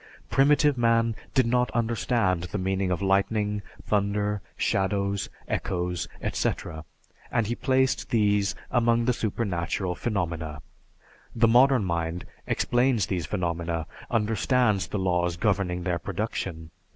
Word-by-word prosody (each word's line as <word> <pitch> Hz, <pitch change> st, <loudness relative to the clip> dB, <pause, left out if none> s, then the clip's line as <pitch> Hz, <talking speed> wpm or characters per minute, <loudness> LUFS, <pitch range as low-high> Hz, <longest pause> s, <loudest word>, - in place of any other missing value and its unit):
Primitive 145 Hz, 0 st, +4 dB
man 115 Hz, -1 st, +3 dB, 0.2 s
did 130 Hz, -3 st, +4 dB
not 125 Hz, 0 st, +2 dB
understand 115 Hz, -6 st, +1 dB
the 95 Hz, -, -4 dB
meaning 95 Hz, 0 st, 0 dB
of 90 Hz, +2 st, -1 dB
lightning, 105 Hz, +2 st, +1 dB, 0.2 s
thunder, 105 Hz, 0 st, 0 dB, 0.2 s
shadows, 100 Hz, 0 st, 0 dB, 0.2 s
echoes, 90 Hz, -2 st, -2 dB, 0.2 s
etc., 80 Hz, 0 st, -2 dB, 0.5 s
and 115 Hz, -2 st, +1 dB
he 115 Hz, -, -1 dB
placed 130 Hz, +1 st, +1 dB
these 105 Hz, -3 st, +2 dB, 0.2 s
among 120 Hz, -1 st, +3 dB
the 125 Hz, -, +3 dB
supernatural 95 Hz, -5 st, -2 dB
phenomena. 85 Hz, -7 st, -3 dB, 0.7 s
The 115 Hz, 0 st, +4 dB
modern 125 Hz, -1 st, +5 dB
mind 85 Hz, 0 st, -2 dB, 0.2 s
explains 120 Hz, -3 st, +2 dB
these 90 Hz, -4 st, -2 dB
phenomena, 85 Hz, -3 st, -2 dB, 0.2 s
understands 110 Hz, -1 st, +1 dB
the -, -, -3 dB
laws 90 Hz, -2 st, 0 dB
governing 95 Hz, -4 st, 0 dB
their 85 Hz, -1 st, -1 dB
production. 80 Hz, 0 st, -4 dB
100 Hz, 115 wpm, -26 LUFS, 90-115 Hz, 0.7 s, modern